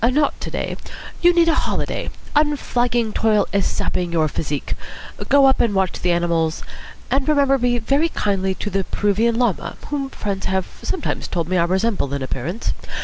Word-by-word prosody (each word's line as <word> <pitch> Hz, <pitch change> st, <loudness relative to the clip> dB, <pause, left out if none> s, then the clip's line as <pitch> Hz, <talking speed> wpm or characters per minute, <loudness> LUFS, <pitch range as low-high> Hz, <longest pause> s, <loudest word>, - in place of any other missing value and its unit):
"Not 275 Hz, +5 st, +2 dB
to -, -, -4 dB
day. -, -, -3 dB, 0.4 s
You 350 Hz, 0 st, +7 dB
need 340 Hz, -1 st, +4 dB
a 330 Hz, -, +4 dB
holiday. -, -, -1 dB, 0.3 s
Unflagging 245 Hz, -6 st, +1 dB
toil 215 Hz, -2 st, +3 dB
is 200 Hz, -1 st, +2 dB
sapping 175 Hz, -1 st, -2 dB
your 160 Hz, -2 st, +2 dB
physique. 145 Hz, -1 st, -3 dB, 0.6 s
Go 280 Hz, 0 st, +6 dB
up 265 Hz, 0 st, +4 dB
and 220 Hz, -4 st, +1 dB
watch 190 Hz, -2 st, 0 dB
the 180 Hz, -, +2 dB
animals, 170 Hz, -2 st, 0 dB, 0.5 s
and 270 Hz, +2 st, +1 dB
remember 280 Hz, -2 st, +4 dB
me 245 Hz, 0 st, +2 dB
very 275 Hz, +8 st, +1 dB
kindly 190 Hz, -7 st, 0 dB
to 205 Hz, -, -4 dB
the 195 Hz, +1 st, 0 dB
Peruvian 215 Hz, +5 st, +1 dB
Llama, 240 Hz, -7 st, 0 dB
whom 275 Hz, -2 st, -1 dB
friends 200 Hz, -6 st, -3 dB
have 190 Hz, -1 st, 0 dB, 0.2 s
sometimes 350 Hz, -, -2 dB
told 170 Hz, -3 st, -2 dB
me 185 Hz, -, -1 dB
I 170 Hz, -, +3 dB
resemble 190 Hz, -6 st, 0 dB
in 140 Hz, -, -3 dB
appearance. 145 Hz, -, -3 dB
210 Hz, 175 wpm, -21 LUFS, 180-270 Hz, 0.6 s, You